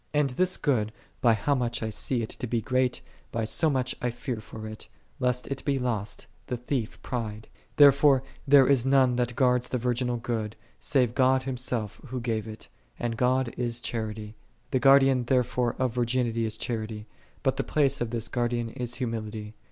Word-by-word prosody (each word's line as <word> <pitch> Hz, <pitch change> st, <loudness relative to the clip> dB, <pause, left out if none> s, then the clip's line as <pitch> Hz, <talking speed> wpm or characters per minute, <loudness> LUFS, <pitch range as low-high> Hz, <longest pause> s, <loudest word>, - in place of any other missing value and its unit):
And 145 Hz, -2 st, +2 dB
this 185 Hz, +8 st, +1 dB
good, 110 Hz, -7 st, +1 dB, 0.3 s
by 115 Hz, -2 st, +5 dB
how 110 Hz, +7 st, 0 dB
much 120 Hz, -3 st, -1 dB
I 110 Hz, -, -2 dB
see 120 Hz, +2 st, -1 dB
it 110 Hz, -, -5 dB
to 125 Hz, -, -5 dB
be 115 Hz, 0 st, 0 dB
great, 130 Hz, +3 st, 0 dB, 0.3 s
by 115 Hz, -, -1 dB
so 160 Hz, +9 st, +2 dB
much 130 Hz, -3 st, 0 dB
I 125 Hz, -, 0 dB
fear 120 Hz, +1 st, -4 dB
for 110 Hz, 0 st, -9 dB
it, 110 Hz, 0 st, -8 dB, 0.3 s
lest 125 Hz, -1 st, 0 dB
it 135 Hz, -1 st, -4 dB
be 140 Hz, -2 st, +1 dB
lost, 115 Hz, -5 st, -3 dB, 0.2 s
the 125 Hz, -, -2 dB
thief 125 Hz, -1 st, -3 dB
prick. 110 Hz, -3 st, -5 dB, 0.2 s
Therefore 140 Hz, -1 st, +6 dB, 0.2 s
there 135 Hz, -1 st, +7 dB
is 135 Hz, -3 st, +4 dB
none 135 Hz, -2 st, +4 dB
that 125 Hz, -1 st, 0 dB
guardeth 125 Hz, -2 st, +2 dB
the 125 Hz, -, 0 dB
virginal 125 Hz, 0 st, 0 dB
good, 115 Hz, -2 st, -3 dB, 0.2 s
save 125 Hz, -4 st, +1 dB
God 130 Hz, 0 st, +3 dB
Himself 125 Hz, -5 st, -3 dB
Who 130 Hz, 0 st, -4 dB
gave 115 Hz, -2 st, -2 dB
it: 110 Hz, 0 st, -9 dB, 0.3 s
and 120 Hz, -1 st, -2 dB
God 125 Hz, 0 st, +1 dB
is 120 Hz, -1 st, 0 dB
Charity.6 110 Hz, -2 st, -4 dB, 0.4 s
The 130 Hz, -, +2 dB
Guardian 135 Hz, -2 st, +5 dB
therefore 125 Hz, -1 st, +1 dB
of 130 Hz, -3 st, 0 dB
virginity 120 Hz, -1 st, 0 dB
is 110 Hz, 0 st, -4 dB
Charity: 110 Hz, -2 st, -4 dB, 0.4 s
but 135 Hz, -1 st, +1 dB
the 135 Hz, -, 0 dB
place 140 Hz, -3 st, +1 dB
of 120 Hz, -, -1 dB
this 115 Hz, -1 st, -2 dB
Guardian 120 Hz, -1 st, -1 dB
is 125 Hz, 0 st, -4 dB
humility. 110 Hz, -3 st, -4 dB
125 Hz, 185 wpm, -27 LUFS, 115-130 Hz, 0.4 s, there